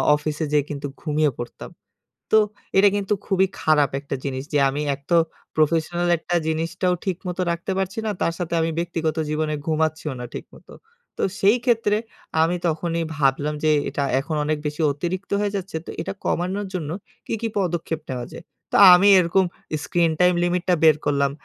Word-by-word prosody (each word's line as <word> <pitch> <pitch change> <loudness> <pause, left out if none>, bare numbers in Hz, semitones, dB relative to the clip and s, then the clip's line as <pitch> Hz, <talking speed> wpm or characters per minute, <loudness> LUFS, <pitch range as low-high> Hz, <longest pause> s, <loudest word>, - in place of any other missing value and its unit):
অফিসে 155 +1 -3
যেয়ে 150 -1 +3
কিন্তু 145 -1 -4
ঘুমিয়ে 150 -2 +1
পড়তাম। 120 - -7 0.7
তো - - +8 0.4
এটা 200 +1 +7
কিন্তু 200 +1 0
খুবই 190 -1 +3
খারাপ 150 -3 +3
একটা 140 -1 -5
জিনিস 130 -1 -3
যে 145 - +3
আমি 140 +2 -2
একত 140 +3 -16 0.5
প্রফেশনাল 165 +3 +1
একটা 175 +2 -2
জিনিসটাও 165 +3 0
ঠিকমতো 185 -1 -3
রাখতে 170 +3 -2
পারছি 190 +3 -2
না - - 0
তার 165 - +1
সাথে 175 -2 -3
আমি 165 0 +1
ব্যক্তিগত 165 -2 -2
জীবনে 155 0 -1
ঘুমাচ্ছিও 155 -2 0
না - - -5
ঠিকমতো। - - -10 0.4
তো - - -3 0.2
সেই 205 +5 +5
ক্ষেত্রে 225 -4 +2 0.5
আমি 170 +2 +2
তখনই 165 +1 -1
ভাবলাম 145 +1 +1
যে 155 - +4 0.2
এটা 140 - -2 0.2
এখন 150 +3 -4
অনেক 155 0 0
বেশি 150 +2 -4
অতিরিক্ত 175 +7 -4
হয়ে 205 0 -1
যাচ্ছে। 190 -3 -5
তো - - -6
এটা - - -3
কমানোর 190 +4 -1
জন্য 155 -4 -3 0.4
কী, - - -5
কী 230 - -1
পদক্ষেপ 170 -3 -2
নেওয়া 125 -2 -4
যায়? - - -10 0.3
তো - - +3 0.2
আমি 195 +3 +5
এরকম 185 +2 +3 0.4
স্ক্রিন 170 -2 +2
টাইম 180 0 +5
লিমিটটা 180 +1 +1
বের 155 -2 +7
করলাম 140 -1 +2
165 Hz, 170 wpm, -23 LUFS, 150-180 Hz, 0.7 s, তো